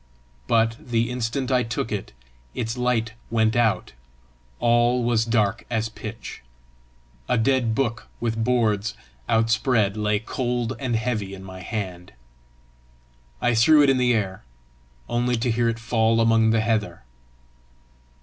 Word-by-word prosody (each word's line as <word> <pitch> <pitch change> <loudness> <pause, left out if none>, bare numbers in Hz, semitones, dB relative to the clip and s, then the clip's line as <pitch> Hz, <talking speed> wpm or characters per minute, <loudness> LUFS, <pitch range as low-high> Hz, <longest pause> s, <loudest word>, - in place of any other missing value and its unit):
But 115 0 +2
the 115 -1 -1
instant 125 +2 -2
I 125 -1 +3
took 115 -1 -3
it, 105 -2 -4 0.4
its 115 -1 -2
light 125 -3 0 0.2
went 110 -1 +2
out; 115 - +1 0.7
all 120 +1 +3
was 115 -1 +2
dark 110 -2 +1
as 115 -1 -1
pitch; 110 +1 -8 0.9
a - - +3
dead 115 -1 +2
book 120 -2 -1
with 115 -1 -1
boards 115 -3 +1 0.3
outspread 115 -2 +2
lay 105 -1 +1
cold 120 +2 -2
and 130 -4 -1
heavy 110 -4 -2
in 95 - -11
my 95 -1 -9
hand. 90 -3 -5 1.3
I 120 - +2
threw 145 +7 +6
it 140 - +5
in 135 - +2
the 125 -1 +3
air 95 -4 -2 0.6
only 120 +1 0
to 120 +1 0
hear 115 +1 +1
it 115 - -2
fall 115 0 +1
among 115 -1 +4
the 110 0 +3
heather. 110 - -1
115 Hz, 140 wpm, -24 LUFS, 110-120 Hz, 1.3 s, threw